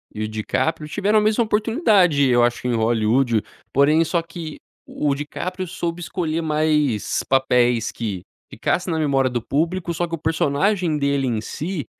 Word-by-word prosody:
o 110 0 -2
DiCaprio 150 +9 -2
tiveram 205 +6 +2
a - - +1
mesma 215 +2 +2
oportunidade 210 - +3
eu 120 -1 +4
acho 120 +1 0
em 120 - 0
Hollywood, 115 +1 +2 0.3
porém 150 +4 +4
só 165 0 -1
que 165 -2 -8 0.3
o 145 -2 -1
DiCaprio 180 +6 -5
soube 170 +1 -4
escolher 165 -1 -2
mais 150 -7 +1
papéis 125 -3 +2
que 100 -6 -4 0.3
ficasse 180 +1 -1
na 160 - 0
memória 135 -4 +2
do 125 - -2
público. 170 +7 -1
Só 175 +1 -1
que 165 - -3
o - - -9
personagem 160 +2 0
dele 140 -1 0
em 115 -3 0
si, 155 - -4
150 Hz, 160 wpm, -21 LUFS, 125-175 Hz, 0.3 s, eu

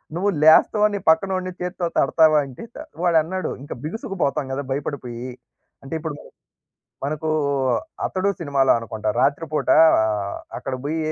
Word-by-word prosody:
నువ్వు 190 +4 +1
లేస్తావా? 210 +7 +6
నీ - - -2
పక్కనోడిని 185 +2 +1
చేత్తో 180 0 -3
తడతావా? 155 -2 +4
అంటే, 130 - -10
త - - -9 0.3
వాడన్నాడు. 175 +2 +1
ఇంక 145 - -6
బిగుసుకు 210 - -5
పోతాం 140 -1 -1
గదా! 140 +2 -3
భయపడిపోయి. 130 -3 -4 0.5
అంటే 135 - -8
ఇప్పుడు 155 -2 -5
మనం - - -14 0.8
మనకూ 155 +2 -3 0.8
'అతడు' 190 +1 0
సినిమాలో 140 -4 +2
అనుకుంటా, 110 -2 -5
రాత్రి 140 +4 +1
పూట 155 - -1 0.9
అక్కడ 135 - -6
బోయి 160 +3 -2
160 Hz, 135 wpm, -22 LUFS, 140-185 Hz, 0.9 s, లేస్తావా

